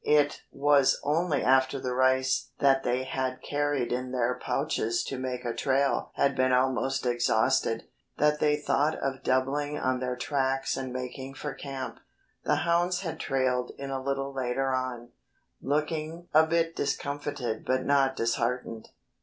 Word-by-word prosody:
It 145 -1 +3
was 140 -1 +3
only 150 0 +1
after 130 +1 +3
the 125 -1 -2
rice 130 +1 +2
that 135 -1 +4
they 125 0 0
had 130 0 -3
carried 145 -3 -1
in 125 +1 -2
their 125 -1 +1
pouches 125 -3 -1
to 135 - -5
make 125 -1 -4
a 120 - -1
trail 135 +3 +1
had 140 -1 +2
been 130 0 +2
almost 130 +1 +1
exhausted, 115 -1 +2 0.3
that 150 0 +3
they 150 -1 +3
thought 150 +1 +1
of 135 -1 -3
doubling 140 +3 0
on 130 0 0
their 125 0 -2
tracks 135 0 0
and 130 -1 -4
making 130 +2 -6
for 145 0 -5
camp. 135 -2 -6 0.5
The - - +3
hounds 175 +2 +2
had 170 -4 -5
trailed 130 -2 0
in 140 0 -5
a 135 -1 -2
little 135 0 -2
later 130 +1 -1
on, 125 -2 -3 0.5
looking 155 +4 -2
a 160 +1 +6
bit 165 0 +1
discomfited 140 -5 -3
but 130 0 0
not 135 -1 +3
disheartened. 115 -1 -2
135 Hz, 155 wpm, -28 LUFS, 130-145 Hz, 0.5 s, a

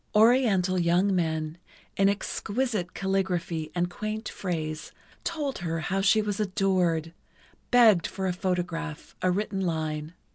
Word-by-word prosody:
Oriental 210 -5 +4
young 180 +3 +3
men, 160 -1 -1 0.4
in 195 0 +4
exquisite 210 -1 -2
calligraphy 185 -4 -1
and 175 0 +1
quaint 215 +5 -4
phrase, 155 -4 -4 0.3
told 300 -5 -2
her 165 -2 -2
how 190 +5 -1
she 215 +2 +4
was 205 -1 -2
adored, 185 -5 +1 0.6
begged 225 -8 +6
for 190 - -4
a 185 - +1
photograph, 175 -4 -3
a 185 - +2
written 195 +1 -1
line. 160 -2 -2
185 Hz, 130 wpm, -27 LUFS, 165-205 Hz, 0.6 s, begged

